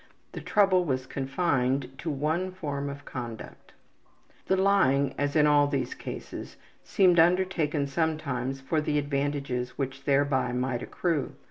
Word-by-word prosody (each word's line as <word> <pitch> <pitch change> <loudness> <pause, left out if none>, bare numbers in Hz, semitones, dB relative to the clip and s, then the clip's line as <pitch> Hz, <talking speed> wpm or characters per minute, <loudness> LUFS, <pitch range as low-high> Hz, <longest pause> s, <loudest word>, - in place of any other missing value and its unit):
The - - -7
trouble 195 -3 +3
was 130 -5 -1
confined 135 -2 -1
to 165 - -4
one 155 +6 -1
form 145 -5 -4
of 140 0 -8
conduct. 120 -3 -8 0.8
The 190 - +2
lying, 165 -9 +3
as 145 +1 -1
in 150 -1 +5
all 145 -1 +5
these 135 -4 -2
cases, - - -8 0.3
seemed 180 -3 +4
undertaken 165 -4 +2
sometimes 140 -3 -2
for 155 +3 0
the 150 0 0
advantages 140 -3 -2
which 135 0 -4
thereby 135 -3 +2
might 125 -1 -1
accrue. 165 -3 -2
145 Hz, 135 wpm, -28 LUFS, 135-160 Hz, 0.8 s, in